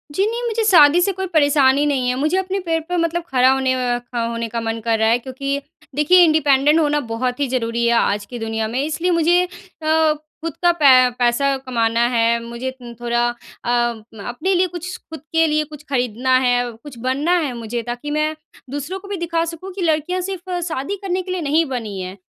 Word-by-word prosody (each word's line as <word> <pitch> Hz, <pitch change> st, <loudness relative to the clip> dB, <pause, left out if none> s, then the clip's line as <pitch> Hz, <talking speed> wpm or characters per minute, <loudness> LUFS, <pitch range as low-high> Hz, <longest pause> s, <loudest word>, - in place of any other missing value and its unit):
जी, 390 Hz, -, +2 dB
नहीं, 465 Hz, +3 st, -2 dB
मुझे 450 Hz, 0 st, -1 dB
शादी 335 Hz, -5 st, +6 dB
से 395 Hz, +3 st, +2 dB
कोई 380 Hz, 0 st, -4 dB
परेशानी 285 Hz, -4 st, +3 dB
नहीं 270 Hz, -4 st, 0 dB
है। 250 Hz, -, 0 dB
मुझे 310 Hz, +6 st, +1 dB
अपने 380 Hz, +1 st, -1 dB
पैर 325 Hz, 0 st, +1 dB
पर 360 Hz, -, 0 dB
मतलब 335 Hz, 0 st, 0 dB
खड़ा 255 Hz, 0 st, +4 dB
होने 265 Hz, -1 st, +1 dB
अ, 245 Hz, -1 st, 0 dB
का 245 Hz, 0 st, -5 dB
होने 230 Hz, 0 st, -3 dB
का 230 Hz, 0 st, -3 dB
मन 225 Hz, 0 st, -3 dB
कर 225 Hz, 0 st, +1 dB
रहा 220 Hz, -, +3 dB
है 235 Hz, -, +4 dB
क्योंकि 275 Hz, +2 st, -3 dB, 0.4 s
देखिए, 305 Hz, +5 st, +5 dB
इंडिपेंडेंट 300 Hz, -1 st, +4 dB
होना 295 Hz, -1 st, +2 dB
बहुत 245 Hz, +3 st, -2 dB
ही 285 Hz, -, +1 dB
ज़रूरी 235 Hz, -2 st, -1 dB
है 235 Hz, -, +3 dB
आज 205 Hz, -3 st, +1 dB
की 240 Hz, +3 st, -8 dB
दुनिया 225 Hz, -1 st, -2 dB
में। 240 Hz, +4 st, -3 dB
इसलिए 330 Hz, +4 st, -1 dB
मुझे 340 Hz, +1 st, +3 dB
अ, -, -, -10 dB, 1.0 s
खुद 330 Hz, -, -3 dB
का 350 Hz, -, +6 dB
पै 265 Hz, -6 st, +6 dB
पैसा 260 Hz, +3 st, +2 dB
कमाना 235 Hz, -3 st, 0 dB
है, 235 Hz, -1 st, +2 dB
मुझे 235 Hz, +2 st, -5 dB
तिन 245 Hz, -2 st, -11 dB
थोड़ा 240 Hz, 0 st, +1 dB
अ, 240 Hz, 0 st, -9 dB, 0.6 s
अपने 280 Hz, +11 st, -1 dB
लिए 365 Hz, 0 st, +3 dB
कुछ 360 Hz, +1 st, -6 dB
खुद 320 Hz, -, -6 dB
के 325 Hz, 0 st, +4 dB
लिए 305 Hz, 0 st, +1 dB
कुछ 300 Hz, -1 st, -12 dB
खरीदना 255 Hz, 0 st, +1 dB
है, 245 Hz, 0 st, +1 dB
कुछ 235 Hz, +3 st, -13 dB
बनना 295 Hz, +7 st, +2 dB
है 290 Hz, -6 st, -2 dB
मुझे 235 Hz, +1 st, -4 dB
ताकि 245 Hz, +5 st, -5 dB
मैं 305 Hz, +1 st, 0 dB, 0.3 s
दूसरों 290 Hz, +8 st, -4 dB
को 395 Hz, -, -13 dB
भी 400 Hz, -1 st, -4 dB
दिखा 335 Hz, -1 st, -1 dB
सकूँ 335 Hz, +3 st, -7 dB
कि 385 Hz, -, -6 dB
लड़कियाँ 330 Hz, +3 st, 0 dB
सिर्फ़ 365 Hz, -1 st, -4 dB
शादी 315 Hz, +4 st, -3 dB
करने 375 Hz, -1 st, -1 dB
के 370 Hz, 0 st, -7 dB
लिए 365 Hz, -, -2 dB
नहीं 310 Hz, +2 st, +2 dB
बनी 210 Hz, -5 st, -5 dB
हैं। 185 Hz, +2 st, -7 dB
280 Hz, 210 wpm, -20 LUFS, 240-335 Hz, 1.0 s, शादी